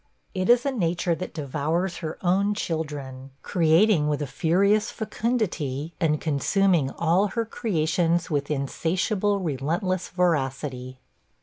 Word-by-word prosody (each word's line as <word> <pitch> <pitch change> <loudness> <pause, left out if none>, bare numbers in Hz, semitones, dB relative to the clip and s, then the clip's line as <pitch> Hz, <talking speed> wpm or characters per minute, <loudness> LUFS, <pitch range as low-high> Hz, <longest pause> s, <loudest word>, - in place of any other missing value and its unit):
It 185 +1 -1
is 245 +1 +5
a 275 - +1
nature 175 -6 0
that 185 +2 -5
devours 155 +5 -2
her 160 -2 -5
own 195 +3 +2
children; 145 -7 -4
creating 165 -1 +3
with 150 -1 0
a - - -1
furious 185 - +2
fecundity, 175 - -2
and 155 -2 +1
consuming 165 0 +2
all 170 +5 +2
her 230 +3 -2
creations 170 -5 0
with 145 -2 -2
insatiable, 185 +8 0
relentless 170 +4 -2
voracity. 135 -7 -1
170 Hz, 120 wpm, -25 LUFS, 150-195 Hz, -, is